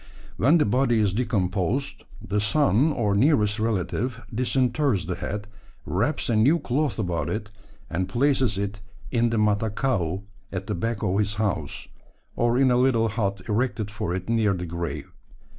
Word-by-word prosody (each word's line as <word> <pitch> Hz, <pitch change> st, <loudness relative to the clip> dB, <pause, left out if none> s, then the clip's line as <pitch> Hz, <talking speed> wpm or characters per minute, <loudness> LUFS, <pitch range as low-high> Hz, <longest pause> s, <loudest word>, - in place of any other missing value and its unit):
When 145 Hz, +8 st, +5 dB
the 155 Hz, -, +3 dB
body 120 Hz, +1 st, +2 dB
is 100 Hz, -3 st, +2 dB
decomposed 105 Hz, +1 st, -1 dB, 0.2 s
the 105 Hz, +1 st, 0 dB
son 130 Hz, -, +3 dB
or 105 Hz, -8 st, 0 dB
nearest 110 Hz, -2 st, +3 dB
relative 115 Hz, +3 st, -2 dB
disinters 125 Hz, -, +1 dB
the -, -, -2 dB
head, 105 Hz, +1 st, -5 dB, 0.4 s
wraps -, -, 0 dB
a 115 Hz, -, +1 dB
new 130 Hz, +10 st, +4 dB
cloth 145 Hz, -1 st, -1 dB
about 90 Hz, -6 st, -1 dB
it, 105 Hz, 0 st, -4 dB, 0.4 s
and 90 Hz, +2 st, -2 dB
places 130 Hz, -2 st, +2 dB
it 100 Hz, +1 st, -3 dB, 0.3 s
in 120 Hz, -1 st, +2 dB
the 115 Hz, -, 0 dB
Matakau 105 Hz, -3 st, 0 dB, 0.3 s
at 95 Hz, 0 st, -4 dB
the -, -, -2 dB
back 110 Hz, +4 st, -2 dB
of 100 Hz, 0 st, +1 dB
his 105 Hz, 0 st, 0 dB
house, 105 Hz, -3 st, -2 dB, 0.5 s
or 120 Hz, +1 st, +2 dB
in 130 Hz, -1 st, +4 dB
a 120 Hz, -, +4 dB
little 120 Hz, -3 st, +3 dB
hut 100 Hz, -3 st, -2 dB
erected 110 Hz, -1 st, -1 dB
for 105 Hz, -5 st, -3 dB
it 95 Hz, 0 st, -5 dB
near 110 Hz, -3 st, +2 dB
the 90 Hz, 0 st, -4 dB
grave. 85 Hz, 0 st, -5 dB
110 Hz, 160 wpm, -25 LUFS, 100-125 Hz, 0.5 s, When